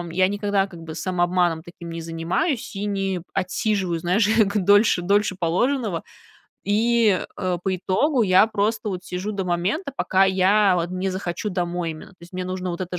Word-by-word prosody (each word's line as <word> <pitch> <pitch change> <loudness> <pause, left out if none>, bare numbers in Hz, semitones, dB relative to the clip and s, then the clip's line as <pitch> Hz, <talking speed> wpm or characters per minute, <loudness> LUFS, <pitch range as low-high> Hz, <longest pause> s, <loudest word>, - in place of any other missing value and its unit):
м 170 - -8
я 185 +2 +3
никогда 200 0 0
как 175 -4 -12
бы 160 -1 -8
самообманом 175 -1 0
таким 175 0 -10
не 165 - -5
занимаюсь 165 - -2
и 200 +1 -3
не 195 -3 -1
отсиживаю, 190 -2 -1
знаешь, 185 +6 +2 0.3
дольше 205 -1 +4
дольше 200 +1 +1
положенного. 190 +3 0 0.6
И, 220 -1 +3 0.2
э, 180 -2 -1
по 190 -1 +1
итогу 240 - +1
я 190 0 +5
просто 215 0 -1
вот 185 -2 -5
сижу 185 +3 -4
до 195 -2 -3
момента, 190 - -1
пока 190 +1 +3
я 190 +1 +3
вот 170 0 -1
не 185 +1 -2
захочу 185 +2 -3
домой 175 -2 -2
именно. 155 - -11
То 180 - -23
есть 175 +2 -14
мне 185 - -3
нужно 185 0 -4
вот 175 +1 -3
это 180 0 -5
185 Hz, 180 wpm, -23 LUFS, 175-205 Hz, 0.6 s, я